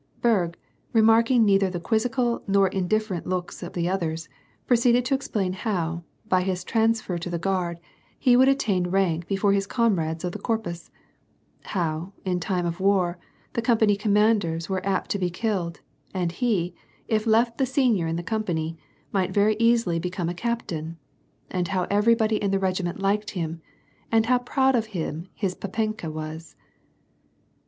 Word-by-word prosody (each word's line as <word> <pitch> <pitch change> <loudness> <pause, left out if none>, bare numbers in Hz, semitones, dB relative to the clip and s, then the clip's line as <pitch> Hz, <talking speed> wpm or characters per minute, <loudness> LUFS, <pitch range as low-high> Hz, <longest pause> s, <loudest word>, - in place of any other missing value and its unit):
Berg, 185 -8 +2 0.4
remarking 225 +1 +5
neither 195 -1 +4
the 180 -1 -4
quizzical 235 +5 0
nor 195 -1 +3
indiffer 195 +1 0
ent - - -8
looks 180 -1 -3
of 175 - -7
the 170 -1 -1
others, 165 -3 -2 0.4
proceeded 245 0 +3
to 265 - 0
explain 210 -8 -1
how, 175 -4 -2 0.2
by 185 -3 +3
his 185 -1 -2
trans 225 +2 +2
fer 180 -5 -4
to 175 - -5
the 175 - -2
Guard, 175 -1 -1 0.4
he 250 -3 +4
would 260 +2 +6
attain 200 -10 +1
rank 175 -3 0
before 200 0 +2
his 195 0 0
comrades 175 -10 0
of 180 - -1
the - - -7
Corpus; 190 -8 -3 0.8
how, 170 0 -2
in 180 -1 0
time 180 0 -1
of 170 0 -3
war, 185 -3 +2 0.3
the 235 - 0
company 220 -3 +3
commanders 205 -5 +2
were 190 -1 -2
apt 195 -1 -1
to 200 - 0
be 180 -1 0
killed; 175 -3 -2 0.3
and 175 -2 0
he, 180 -4 0 0.3
if 220 0 0
left 230 +1 +3
the 265 - +3
senior 245 - +2
in 165 - -1
the 170 - -3
com 220 +3 -1
pany, 165 -3 -2 0.3
might 190 -2 +1
very 210 +1 +3
easily 230 -7 +3
become 180 0 -3
a - - -2
captain; 170 -7 -3 0.5
and 180 -1 -1
how 190 -2 0
everybody 220 +1 +3
in 200 - -1
the 195 - +2
regiment 185 -1 -1
liked 205 +2 0
him, 165 -3 -4 0.5
and 225 -1 +4
how 250 +1 +3
proud 265 +2 +2
of 225 -2 0
him 165 +1 -4
his 195 -4 -1
papenka 215 -2 -3
was. 155 +1 -7
195 Hz, 170 wpm, -25 LUFS, 175-225 Hz, 0.8 s, would